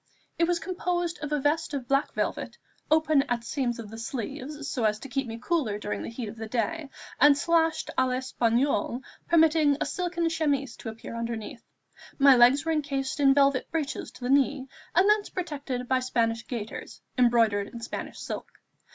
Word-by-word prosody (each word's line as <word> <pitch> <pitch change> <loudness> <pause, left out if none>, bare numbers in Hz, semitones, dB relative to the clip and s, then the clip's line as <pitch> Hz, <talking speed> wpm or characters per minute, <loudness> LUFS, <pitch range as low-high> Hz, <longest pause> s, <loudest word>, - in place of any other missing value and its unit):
It 335 - +4
was 350 0 +2
composed 350 -1 -2
of 300 -1 -5
a 300 - +1
vest 295 +2 0
of 260 -3 -4
black 275 +3 +1
velvet, - - -2 0.3
open 310 -2 +4
at 240 -1 -1
seams 240 -1 -2
of 220 -3 -8
the 225 - -8
sleeves, 270 +5 -5
so 250 - -2
as 215 -1 +2
to 275 - -9
keep 270 0 -2
me 225 0 -5
cooler 250 -5 -1
during 210 0 -4
the - - -5
heat 230 0 -5
of 215 +2 -8
the 225 0 -5
day, 280 +7 -2 0.3
and 285 +1 +7
slashed 325 0 +1
à 260 - +3
l'Espagnole, 250 -1 0 0.2
permitting 315 -3 +4
a - - 0
silken 350 -2 -1
chemise 290 -6 0
to 225 - -6
appear 225 +1 -8
underneath. 230 +2 -5 0.6
My 275 -1 +7
legs 250 +5 +5
were 325 - +1
encased 280 -3 -1
in 275 -1 +5
velvet 280 -2 +3
breeches 310 -4 -3
to - - -15
the 245 +1 -1
knee, 275 -1 +2 0.3
and 370 +3 +5
thence 420 0 +3
protected 285 -8 -4
by 260 0 +2
Spanish 230 -2 -1
gaiters, 225 -4 -6 0.2
embroidered 225 -5 +3
in 235 - -9
Spanish 230 - -6
silk. - - -5
275 Hz, 185 wpm, -27 LUFS, 235-310 Hz, 0.6 s, and